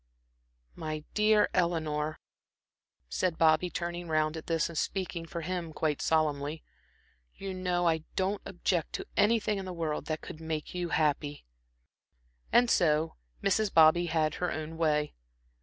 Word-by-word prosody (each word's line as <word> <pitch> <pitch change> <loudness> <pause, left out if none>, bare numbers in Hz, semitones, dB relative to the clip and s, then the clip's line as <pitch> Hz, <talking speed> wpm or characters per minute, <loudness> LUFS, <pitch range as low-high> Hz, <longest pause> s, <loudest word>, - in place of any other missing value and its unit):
"My 155 - -5
dear 210 0 +4
Eleanor," 155 -4 0 0.9
said 175 - -1
Bobby, 160 +2 +4
turning 175 +1 -4
round 155 0 +1
at 160 - -7
this 165 -2 +1
and 170 - -9
speaking 175 -1 -2
for 170 +1 -5
him 175 -1 -3
quite 150 -2 -1
solemnly. 155 -1 0 0.7
"You 195 -1 -5
know 180 -1 0
I 160 -1 +3 0.2
don't 195 +2 0
object 175 -3 -1
to - - -4
anything 210 -1 +3
in 190 - -5
the 185 - -5
world 160 -4 -2
that 155 0 -3
could 155 - -9
make 160 -1 -4
you 175 -1 -2
happy." 150 - 0 1.1
And 245 +1 +5
so 160 -6 +2 0.3
Mrs. 200 +1 +2
Bobby 165 +2 +6
had 155 -2 +1
her 180 - +1
own 155 +1 -5
way. 150 -2 +1
165 Hz, 145 wpm, -30 LUFS, 155-180 Hz, 1.1 s, Bobby